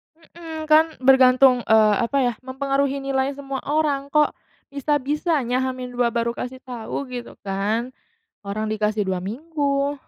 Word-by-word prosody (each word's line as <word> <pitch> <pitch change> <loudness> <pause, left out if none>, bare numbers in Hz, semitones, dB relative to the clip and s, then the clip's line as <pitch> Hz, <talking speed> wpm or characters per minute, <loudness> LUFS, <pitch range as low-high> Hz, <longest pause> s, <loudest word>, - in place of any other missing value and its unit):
Mhm, 325 -1 -9
kan 315 +1 +7 0.2
bergantung 260 -1 +6
eee, 215 -1 +5
apa 280 +4 -1
ya, 245 -1 +1
mempengaruhi 275 +1 -1
nilai 270 0 -1
semua 275 -1 -5
orang. 290 -2 0
Kok 300 0 +3 0.4
bisa-bisanya 285 -2 0
H-2 250 -2 -1
baru 235 0 -1
kasih 255 +1 -6
tahu 245 +1 -5
gitu 245 -1 -7
kan, 210 +6 -1 0.5
orang 215 +2 -3
dikasih 210 -1 0
2 185 -1 -1
minggu. 280 - -1
265 Hz, 130 wpm, -22 LUFS, 235-280 Hz, 0.5 s, kan